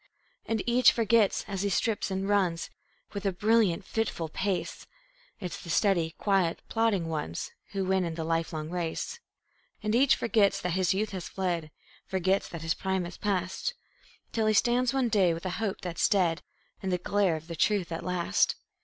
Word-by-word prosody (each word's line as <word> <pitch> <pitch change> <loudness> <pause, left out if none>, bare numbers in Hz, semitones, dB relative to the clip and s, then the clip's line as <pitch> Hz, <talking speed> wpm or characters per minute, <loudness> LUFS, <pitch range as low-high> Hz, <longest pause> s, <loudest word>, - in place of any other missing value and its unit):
And 225 -3 0
each 245 +1 +6
forgets, 225 -2 +2
as 195 -2 -3
he 200 - 0
strips 215 +3 0
and 190 0 -2
runs 185 -5 +1 0.4
With 200 -1 -4
a 195 - +1
brilliant, 205 -1 +2
fitful 200 -8 -2
pace, 190 +2 -3 0.5
It's 180 -4 -5
the 170 - -10
steady, 170 -3 +2
quiet, 190 -5 +1
plodding 225 -7 +1
ones 150 - -3 0.2
Who 195 -1 -1
win 190 0 +2
in 165 -2 -3
the 165 - -3
lifelong 160 -1 -2
race. 175 - -3 0.6
And 215 0 0
each 265 +3 +5
forgets 220 -4 +2
that 180 - -1
his 185 +1 +2
youth 210 +2 -1
has 185 -3 -5
fled, 175 -5 -2 0.4
Forgets 190 +1 +1
that 170 -2 -7
his 160 0 +1
prime 190 -2 -1
is 175 - -8
past, 195 - -1 0.6
Till 220 -1 +1
he 215 - +3
stands 245 +3 +3
one 265 -3 +1
day, 190 -6 +3
with 170 - -8
a 185 - -1
hope 210 -4 -2
that's 175 -2 0
dead, 180 -4 +2 0.4
In 190 - -2
the 180 - +1
glare 190 -1 +1
of 155 0 -7
the 170 - -6
truth 185 +2 +1
at 165 - -4
last. 180 - +1
190 Hz, 180 wpm, -29 LUFS, 170-210 Hz, 0.6 s, each